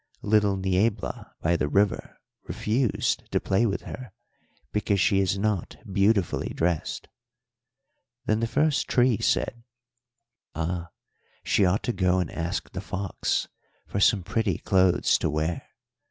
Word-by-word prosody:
Little 105 -2 +3
Niebla 95 +3 -1
by 85 +1 +2
the 75 - 0
river 100 +4 0 0.3
refused 115 +2 -1
to - - +2
play 100 +5 +1
with 100 - -2
her 125 -5 -8 0.6
because 105 -1 0
she 95 +2 +3
is 95 0 +1
not 100 -3 -1 0.2
beautifully 100 -2 +1
dressed.' 85 -1 -1 1.2
"Then 110 0 +1
the 115 - 0
first 150 +4 +1
tree 120 -4 +3
said, 120 -1 0 0.9
'Ah, 85 +1 -3 0.5
she 100 - +3
ought 90 +3 +1
to 120 - -1
go 95 -2 +2
and 90 -2 -1
ask 85 +4 -3
the 95 - -5
fox 100 -1 -2 0.4
for 100 - -3
some 100 -1 +4
pretty 105 -2 0
clothes 95 -2 +3
to - - 0
wear. 80 +2 -2
100 Hz, 135 wpm, -26 LUFS, 90-110 Hz, 1.2 s, some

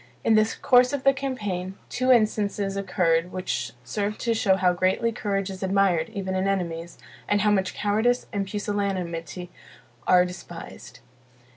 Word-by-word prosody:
In 225 - +3
the 215 0 +4
course 250 +1 +5
of 280 -2 -2
the 275 - +5
campaign, 205 -9 -4
two 255 +1 +1
instances 210 -4 +2
occurred 180 -3 +1
which 125 -10 -3
served 205 +9 -3
to 235 - +1
show 200 -4 +3
how 185 -1 +2
greatly 185 +6 +1
courage 195 -3 -2
is 190 - -8
admired 190 -4 +2
even 195 -4 -4
in 190 +1 0
enemies, 170 -3 -3 0.3
and 205 0 +2
how 210 0 +3
much 190 -2 0
cowardice 220 +4 +1
and 200 -1 -1
pusillanimity 185 -5 -3 0.6
are 180 0 +6
despised. 175 -8 -10
195 Hz, 150 wpm, -25 LUFS, 180-215 Hz, 0.6 s, are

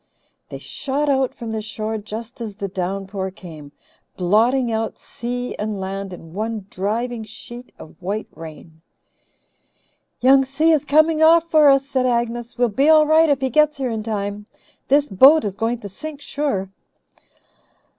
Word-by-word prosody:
They - - -6
shot 280 +2 -3
out 265 -2 +2
from 230 -1 -6
the 220 -1 -3
shore 215 0 -4
just 225 +3 -8
as 215 -3 -5
the 200 -1 -4
downpour 190 +1 -4
came, 160 -6 -12 0.5
blotting 230 +7 +2
out 220 0 -2
sea 245 +1 -5
and 210 -1 -3
land 195 0 -5
in 165 -2 -11
one 215 0 -4
driving 225 +4 -2
sheet 240 +3 -11
of 160 - -14
white 200 +4 -3
rain. 160 0 -12 1.4
"Young 270 +1 +5
Si 275 +5 +1
is 300 -3 +2
coming 310 +2 +3
off 330 +1 +5
for 305 -2 +6
us," 275 0 +4
said 260 -2 0
Agnes. 240 0 -2
"We'll 245 -1 +2
be 275 +8 +2
all 310 -1 +7
right 315 +1 +4
if 280 -2 +1
he 265 -1 -1
gets 300 +2 +3
here 260 -3 -2
in 220 -1 -3
time. 205 -1 -4 0.4
This 285 +2 +3
boat 265 +8 +6
is 200 - -2
going 225 +4 -1
to 200 - -7
sink, 300 +9 -8
sure." 275 -11 -3
235 Hz, 165 wpm, -21 LUFS, 200-275 Hz, 1.4 s, all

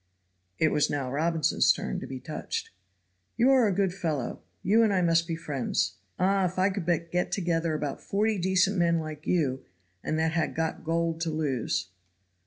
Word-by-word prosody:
It 160 - +3
was 150 -1 +2
now 135 -3 -2
Robinson's 160 +2 +2
turn - - -2
to - - -7
be 130 -1 -6
touched. - - -5 0.7
"You 250 +3 +5
are 255 -4 +5
a - - +2
good 190 -1 +1
fellow. 155 -9 -3 0.2
You 215 +5 +4
and 220 -2 +4
I 185 -2 +2
must 165 -1 +3
be 165 - -2
friends. 135 - -2 0.2
Ah! 190 +1 +2
if 180 +1 -3
I 190 +2 +3
could 190 -4 -4
but 170 -1 0
get 180 0 0
together 165 -3 0
about 145 -2 -3
forty 210 +1 0
decent 190 +2 +2
men 170 -1 +3
like 155 -1 -6
you, 135 -7 +1 0.4
and 155 - -1
that 160 0 +1
had 165 0 -1
got 160 0 -2
gold 165 0 -1
to 165 - 0
lose." 130 - -1
165 Hz, 190 wpm, -28 LUFS, 155-185 Hz, 0.7 s, You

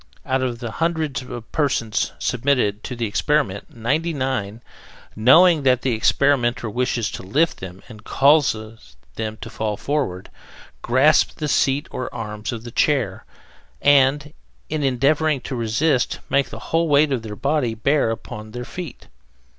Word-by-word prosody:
Out 130 0 0
of 120 -1 -3
a 115 - -4
hundred 160 -4 -1 0.3
persons 125 -7 0
submitted 125 -5 0
to 125 - -5
the 120 -1 -2
experiment, 105 -1 0
ninety 150 +9 0
nine, 120 -5 -3 0.5
knowing 160 - +6
that 130 -2 +2
the 130 - +1
experimenter 120 0 +2
wishes 120 -1 -1
to - - -7
lift 145 - 0
them 95 0 -9
and 110 -2 -13
cause 140 +1 +4 0.6
them 110 -1 -4
to - - -7
fall 105 -2 -3
forward, 135 -11 -3 0.5
grasp 130 +6 +3
the 155 - -2
seat 140 0 +1
or 130 - -4
arms 105 -1 -5
of 115 -2 -6
the 120 - -8
chair, 120 -9 0 0.5
and, 145 +1 +3 0.4
in 155 0 -2
endeavoring 140 +3 +2
to 130 - -5
resist, 125 +4 +1
make 140 0 +2
the - - -8 0.2
whole 165 +1 +3
weight 145 0 +4
of 130 -4 0
their 110 -2 -7
body 140 -3 0
bear 140 +3 +1
upon 110 -1 -7
their 125 0 -5
feet. 175 -2 -8
130 Hz, 150 wpm, -21 LUFS, 115-145 Hz, 0.6 s, knowing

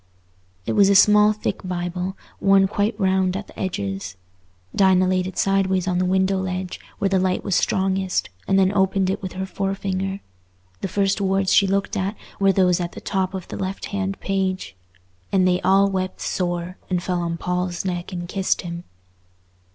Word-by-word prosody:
It - - -1
was 200 -1 +5
a 200 - +4
small 210 +1 +6
thick 215 - -3
Bible, 180 +1 -3 0.2
worn 195 -1 +5
quite 205 +2 -1
round 190 -1 +2
at 205 - -6
the - - -15
edges. 100 - -3 0.6
Dinah 185 -2 +4
laid 185 0 +1
it 185 - -8
sideways 190 -1 +1
on 180 -1 +1
the 185 - +1
window 190 +1 +2
ledge, 185 -1 -4 0.2
where 200 - +1
the 190 -1 +2
light 185 0 0
was 195 - 0
strongest, 190 - 0 0.2
and 195 - +3
then 190 0 +3
opened 190 -1 +2
it - - -3
with 190 -2 -5
her 190 +1 -3
forefinger. 195 0 -2 0.6
The - - -2
first 195 +2 0
words 195 0 +1
she 200 - +5
looked 195 +1 0
at 195 +2 -1 0.2
were 195 -1 +4
those 180 -2 +3
at 175 -1 -3
the - - -8
top 190 -1 -2
of 185 - -6
the - - -5
left 190 0 -4
hand 195 -1 -2
page: 190 - -2 0.6
"And 185 -1 +3
they 180 0 +2
all 195 +2 +4
wept 185 -1 -3
sore, 175 0 -2
and 180 -2 0
fell 180 -1 -1
on 170 -1 -2
Paul's 180 0 -2
neck 175 0 -3
and 175 -1 -5
kissed 190 +1 0
him." 170 0 -6
190 Hz, 185 wpm, -22 LUFS, 180-195 Hz, 0.6 s, small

